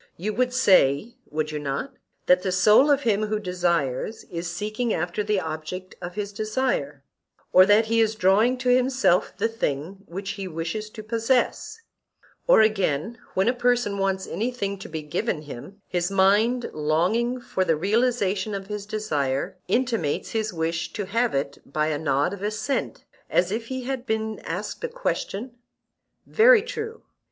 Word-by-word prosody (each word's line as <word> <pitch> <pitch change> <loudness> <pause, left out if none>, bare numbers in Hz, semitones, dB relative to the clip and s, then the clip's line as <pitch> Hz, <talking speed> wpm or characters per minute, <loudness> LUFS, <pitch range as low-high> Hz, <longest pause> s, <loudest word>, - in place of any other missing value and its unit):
You 210 +5 -3
would 250 +3 +1
say—would 185 - +2
you 150 - -3
not?—that 165 - -1
the 185 - -1
soul 210 +9 +5
of 285 -1 +3
him 215 -2 +1
who 215 0 0
desires 175 - -1
is 170 0 -4
seeking 215 +6 -2
after 175 +5 -2
the 210 -1 +1
object 160 +3 -6
of 175 0 -6
his 205 -1 -4
desire; 215 - -2 0.5
or 185 +1 +8
that 210 +2 +5
he 230 +1 +2
is 220 0 +1
drawing 215 +6 +3
to 255 0 -1
himself 255 -6 +2
the 220 - +1
thing 185 -5 -3
which 195 +3 -5
he 195 -2 -5
wishes 175 +6 -4
to 215 0 -9
possess: 230 - 0 0.7
or - - +7
again, 215 -1 +1 0.2
when 190 +3 +2
a 245 - +4
person 245 -5 +1
wants 190 -1 0
anything 205 -4 -3
to - - -9
be 160 -2 -5
given 155 +2 -2
him, 150 +8 -10
his 175 0 -1
mind, 205 +6 +3
longing 180 +12 +1
for 190 -5 -1
the 165 -3 +2
realization 205 +1 0
of 195 -1 -5
his 205 0 -6
desire, 160 -6 -1
intimates 230 - 0
his 220 -1 -1
wish 165 0 -2
to 205 - -3
have 230 +2 0
it 140 0 -2
by 150 +2 -1
a 150 -2 -1
nod 145 +4 +1
of 200 - -8
assent, 215 +6 -2 0.2
as 180 +1 +2
if 225 +2 -3
he 260 0 -4
had 260 0 -4
been 220 0 -2
asked - - -5
a - - 0
question? 250 - -4 0.7
Very 455 -1 +6
true. 460 -1 -6
205 Hz, 165 wpm, -25 LUFS, 175-235 Hz, 0.7 s, or